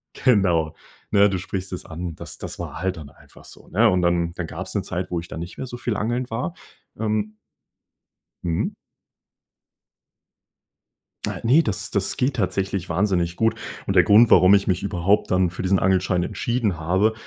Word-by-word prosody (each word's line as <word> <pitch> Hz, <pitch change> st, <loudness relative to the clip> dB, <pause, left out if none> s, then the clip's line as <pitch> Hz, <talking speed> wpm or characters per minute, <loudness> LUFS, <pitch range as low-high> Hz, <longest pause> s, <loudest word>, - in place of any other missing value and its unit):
Genau, 90 Hz, -10 st, +2 dB, 0.4 s
ne? 100 Hz, -1 st, +5 dB
Du 95 Hz, -, -1 dB
sprichst 95 Hz, +1 st, -5 dB
es 90 Hz, -, -5 dB
an. 85 Hz, +1 st, -6 dB
Das -, -, -8 dB
das -, -, -7 dB
war 80 Hz, -, -6 dB
halt 95 Hz, 0 st, -1 dB
dann 75 Hz, -3 st, -10 dB
einfach -, -, -18 dB
so, -, -, -13 dB
ne? 115 Hz, +6 st, +4 dB
Und 90 Hz, -1 st, +1 dB
dann 85 Hz, -1 st, +1 dB
dann 90 Hz, -, -4 dB
gab's -, -, -6 dB
'ne -, -, 0 dB
Zeit, -, -, -4 dB
wo 85 Hz, -1 st, -1 dB
ich 85 Hz, -, -12 dB
dann 80 Hz, -, -6 dB
nicht 85 Hz, +1 st, -7 dB
mehr 130 Hz, -, -5 dB
so 120 Hz, -, -7 dB
viel 120 Hz, -3 st, -2 dB
angeln 120 Hz, +4 st, -1 dB
war, 125 Hz, +10 st, -3 dB, 0.4 s
ähm 105 Hz, -1 st, -1 dB, 1.1 s
Mhm. 85 Hz, -2 st, -1 dB, 2.6 s
Äh, -, -, -4 dB
ne, 145 Hz, +8 st, +6 dB
das 100 Hz, -5 st, -2 dB
das 100 Hz, -1 st, 0 dB
geht 130 Hz, 0 st, 0 dB
tatsächlich 95 Hz, -2 st, -1 dB
wahnsinnig 90 Hz, -1 st, 0 dB
gut. 115 Hz, 0 st, +2 dB, 0.3 s
Und -, -, -1 dB
der -, -, +7 dB
Grund, 110 Hz, +3 st, +6 dB
warum 90 Hz, +2 st, +7 dB
ich 100 Hz, -1 st, +3 dB
mich 90 Hz, -2 st, 0 dB
überhaupt 100 Hz, +1 st, +1 dB
dann 90 Hz, -1 st, +2 dB
für 90 Hz, -, -6 dB
diesen 95 Hz, +1 st, +2 dB
Angelschein 95 Hz, -1 st, +2 dB
entschieden 105 Hz, -2 st, -1 dB
habe, 95 Hz, +7 st, +2 dB
95 Hz, 180 wpm, -23 LUFS, 90-105 Hz, 2.6 s, der